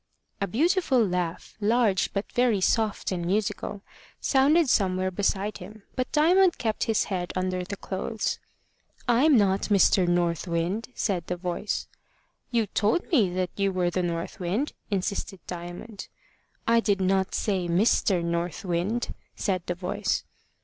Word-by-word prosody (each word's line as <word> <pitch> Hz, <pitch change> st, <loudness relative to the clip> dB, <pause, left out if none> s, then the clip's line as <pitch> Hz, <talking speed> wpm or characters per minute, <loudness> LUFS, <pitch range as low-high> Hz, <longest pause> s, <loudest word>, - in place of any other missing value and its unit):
A 200 Hz, -, +1 dB
beautiful 300 Hz, -, +2 dB
laugh, 180 Hz, -3 st, -3 dB
large 210 Hz, -3 st, +2 dB
but 200 Hz, +1 st, -2 dB
very 245 Hz, -4 st, +2 dB
soft 215 Hz, +2 st, +1 dB
and 175 Hz, -2 st, -2 dB
musical, 205 Hz, +2 st, -2 dB, 0.4 s
sounded 290 Hz, +4 st, +4 dB
somewhere 185 Hz, -5 st, +2 dB
beside 200 Hz, +2 st, -1 dB
him, 215 Hz, 0 st, -11 dB
but 255 Hz, 0 st, -2 dB
Diamond 350 Hz, +4 st, +4 dB
kept 220 Hz, -2 st, -1 dB
his 225 Hz, -2 st, +2 dB
head 180 Hz, -3 st, -3 dB
under 185 Hz, 0 st, -1 dB
the 200 Hz, +3 st, -6 dB
clothes. 205 Hz, +4 st, -3 dB, 0.7 s
"I'm 255 Hz, +4 st, +5 dB
not 195 Hz, -1 st, +2 dB
Mr. 190 Hz, -2 st, +4 dB
North 175 Hz, 0 st, +1 dB
Wind," 175 Hz, +7 st, -1 dB
said 185 Hz, -6 st, -1 dB
the 180 Hz, -, -2 dB
voice. 180 Hz, +3 st, -3 dB, 0.6 s
"You 230 Hz, -2 st, +1 dB
told 210 Hz, -, 0 dB
me 230 Hz, -, +4 dB
that 185 Hz, -1 st, -1 dB
you 195 Hz, -1 st, +1 dB
were 180 Hz, -2 st, 0 dB
the 185 Hz, -, 0 dB
North 170 Hz, -1 st, -3 dB
Wind," 195 Hz, +11 st, -1 dB, 0.2 s
insisted 195 Hz, -1 st, -2 dB
Diamond. 175 Hz, +4 st, -7 dB, 0.6 s
"I 230 Hz, 0 st, +5 dB
did 205 Hz, -4 st, +1 dB
not 190 Hz, 0 st, +1 dB
say 190 Hz, -4 st, 0 dB
Mister 180 Hz, 0 st, +2 dB
North 170 Hz, +1 st, -2 dB
Wind," 185 Hz, +7 st, -1 dB, 0.2 s
said 185 Hz, -3 st, -1 dB
the 175 Hz, -, -1 dB
voice. 200 Hz, +3 st, -1 dB
195 Hz, 145 wpm, -26 LUFS, 180-225 Hz, 0.7 s, I'm